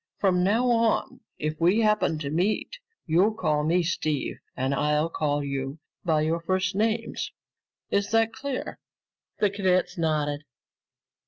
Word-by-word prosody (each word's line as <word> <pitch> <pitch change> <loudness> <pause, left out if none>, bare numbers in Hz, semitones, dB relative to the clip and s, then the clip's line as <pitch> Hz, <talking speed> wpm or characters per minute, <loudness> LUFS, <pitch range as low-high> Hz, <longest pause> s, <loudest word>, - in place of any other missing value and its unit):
From 180 -3 +2
now 220 +6 +3
on, 230 -1 +1 0.2
if 155 +1 -3
we 185 +7 +4
happen 210 -7 +2
to 145 -2 -4
meet, 205 - 0 0.3
you'll 170 +3 +4
all 220 - +1
call 155 -8 +1
me 170 +3 +2
Steve 155 -4 -1 0.2
and 130 +2 0
I'll 150 +3 +1
call 145 -2 0
you 140 +1 -3 0.3
by 160 -3 +2
your 160 +2 +1
first 185 +2 0
names. 220 +3 -1 0.6
Is 200 0 +1
that 225 0 +2
clear?" 265 +2 -5 0.6
The 205 -2 +2
cadets 185 -3 +1
nodded. 150 -3 0
175 Hz, 145 wpm, -26 LUFS, 150-210 Hz, 0.6 s, we